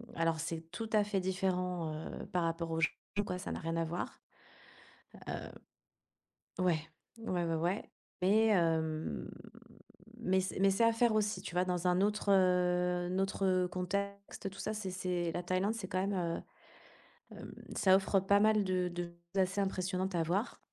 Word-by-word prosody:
alors 165 -1 +1
c'est 165 0 -3
tout 225 +5 -5
à 210 -1 +5
fait 205 -1 0
différent, 180 -3 -1
heu, 155 - -6
par 180 -4 0
rapport 165 0 -1
au 160 - 0
Japon, 165 - +2 0.3
quoi, 180 -2 -3
ça 180 - -5
n'a - - -3
rien 165 0 -2
à 165 - +2
voir, 170 +2 -4 1.1
heu - - -6 1.0
ouais. 175 -3 +3 0.4
Ouais, 185 -6 -1
ouais, 165 -1 0
ouais 175 +6 -1 0.3
mais 215 +4 +5
hem, 160 - +1 0.9
mais 190 +1 +2
c'est 185 0 -3
mais 195 0 +6
c'est 195 +4 +3
à 230 - +5
faire 230 0 +3
aussi, 210 -3 +1
tu 175 - -7
vois, 180 +1 +3
dans 180 -1 -1
un 180 +1 +3
autre, 205 0 +1
heu, 180 -1 +3
un 190 - 0
autre 190 -2 +2
contexte, 200 +2 -3
tout 195 - -13
ça, 215 - -2
c'est 200 -3 -4
c'est 180 -2 -1
la 175 - -2
Thaïlande, 185 +5 0
c'est 210 -5 -5
quand 185 0 0
même, 200 - -1
heu, 170 -3 -1 1.0
hem, - - -9 0.2
ça 190 -1 +6
offre 195 0 +2
pas 200 +2 +4
mal 215 -1 +5
de 185 -1 +1
de 175 0 -3 0.3
choses 195 - +4
assez 190 +2 0
impressionnantes 185 0 -1
à 170 - +2
voir 185 +8 -1
185 Hz, 180 wpm, -34 LUFS, 175-195 Hz, 1.1 s, mais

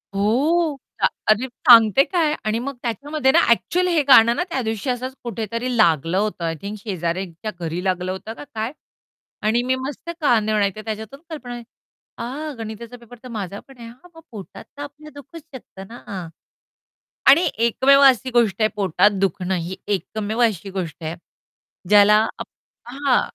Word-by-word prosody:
हो. 285 +10 +1 0.2
अ, - - +5 0.2
अरे, 215 +4 +3
सांगते 235 0 +6
काय 325 -4 0
आणि 215 +1 0
मग 275 +3 -5
त्याच्यामध्ये 265 +4 0
ना - - +5
ॲक्चुअली 360 +10 +2
हे 330 -3 +3
गाणं 235 -3 +7
ना 350 - 0
त्यादिवशी 235 - -3
असंच 255 +1 -3
कुठेतरी 230 +2 -3
लागलं 165 -3 +3
होतं, 205 -3 -1
आय 165 0 -2
थिंक 205 +2 -6
शेजाऱ्याच्या 185 0 -4
घरी 170 +1 -4
लागलं 185 -1 -1
होतं 190 +4 -6
का - - -10
काय? 220 +2 -2 0.7
आणि 220 +3 +1
मी 260 +1 +1
मस्त 280 +5 -7
कान 235 -7 +3
देऊन 215 -1 +1
ऐकते 200 +1 -1
त्याच्यातून 220 +5 -6
कल्पना 245 -6 -7 0.6
अ, 290 +6 -5
गणिताचा 225 +2 -8
पेपर 240 0 -15
तर - - -9
माझा 200 -4 -5
पण 270 -1 -16
आहे 235 -1 -10
हां 250 +9 -15
मग 325 - -13
पोटात 205 -5 -10
तर - - -7
आपल्या 300 +1 -11
दुखूच 305 +4 -11
शकत 250 -6 -12
ना. 235 - -10
हां, 190 -6 -6 1.0
आणि 330 +5 +6 0.2
एकमेव 275 +4 +4
अशी 260 -1 +5
गोष्ट 230 -4 +2
आहे 215 - +4
पोटात 200 0 +3
दुखणं 190 0 -1
ही 175 +1 -4 0.2
एकमेव 215 +3 -4
अशी 200 -4 -3
गोष्ट 175 -4 -6
आहे 160 +1 -4 0.7
ज्याला 210 0 +7 0.2
आप - - -6 0.4
हां, 270 0 +1
230 Hz, 165 wpm, -21 LUFS, 200-265 Hz, 1.0 s, गाणं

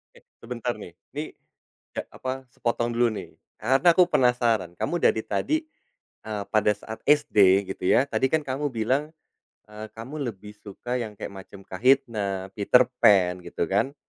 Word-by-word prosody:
Eh, - - -19 0.2
sebentar 120 0 -3
nih. 90 -5 -11 0.2
Ini 150 +2 -3 0.7
e - - +1
apa? 130 0 -6
Sepotong 120 0 -1
dulu 120 0 +3
nih, 105 - -9 0.2
karena 135 +9 +4
aku 180 - +6
penasaran. 120 - +2
Kamu 175 - -1
dari 110 -9 +2
tadi, 310 - 0 0.7
eee, 105 -2 -4
pada 105 -1 +3
saat 110 +2 -9
SD 100 -9 +4
gitu - - -15
ya, 130 - +4
tadi - - +1
kan 160 - +2
kamu 140 +2 -2
bilang, 130 +8 -1 0.6
eee, 105 +1 -8
kamu 130 +7 -7
lebih 105 0 -11
suka 115 +5 -5
yang 105 -3 -7
kayak - - -7
macam 100 0 -15
Kahitna, 105 -4 +1
Peterpan, 105 -5 +4
gitu 85 - -2
kan. 130 +8 +1
115 Hz, 155 wpm, -25 LUFS, 100-130 Hz, 0.7 s, aku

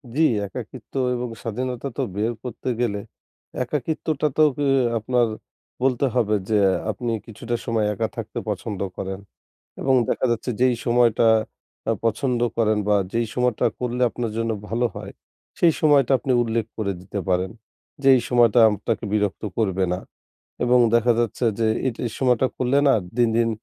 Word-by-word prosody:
জ্বী, 160 - +3 0.2
একাকিত্ব - - -9 0.2
এবং 125 0 -3
স্বাধীনতা 125 +3 -3
তো - - 0
বের 110 +3 0
করতে 125 0 -5
গেলে 105 -4 0 0.6
একাকিত্বটাতেও 150 +2 0
কে 145 - 0 0.3
আপনার 120 +2 +1 0.6
বলতে 130 0 +2
হবে 110 -4 +2
যে, 110 - +3 0.3
আপনি 120 +2 -3
কিছুটা 120 +2 -4
সময় 110 -2 0
একা 100 - -1
থাকতে - - -4
পছন্দ 105 -4 -4 0.2
করেন। 95 0 -4 0.6
এবং 135 - +2 0.2
দেখা - - 0
যাচ্ছে 120 +2 -2
যেই 130 -1 +4
সময়টা 120 -1 +3 0.6
আ - - +4
পছন্দ 125 +2 0 0.2
করেন 110 -2 +2
বা 105 - +4 0.2
যেই 115 0 0
সময়টা 125 -2 +1
করলে 125 0 -2
আপনার 115 -2 -4
জন্য 115 0 0 0.2
ভালো 115 +3 0
হয়, - - -7 0.5
সেই 165 -3 +5
সময়টা 145 -4 +4
আপনি 135 - -2
উল্লেখ 115 -1 -1
করে 105 -3 -1
দিতে 100 +2 -5
পারেন, 90 +1 +1 0.5
যে 135 - 0
এই 125 - +2
সময়টা 120 -2 +4
আপনাকে 110 +2 -2
বিরক্ত 105 -3 0
করবে 95 -4 +1
না। 90 - -2 0.7
এবং 125 0 +4 0.2
দেখা 120 +1 +4
যাচ্ছে 120 +1 -1
যে 110 - +2 0.2
এটি 115 - -4 0.2
সময়টা 130 -1 +3
করলে 130 +2 +1
না 135 - +6 0.2
দিন, 120 -1 +4
দিন, 115 -1 +3
120 Hz, 155 wpm, -23 LUFS, 110-125 Hz, 0.7 s, না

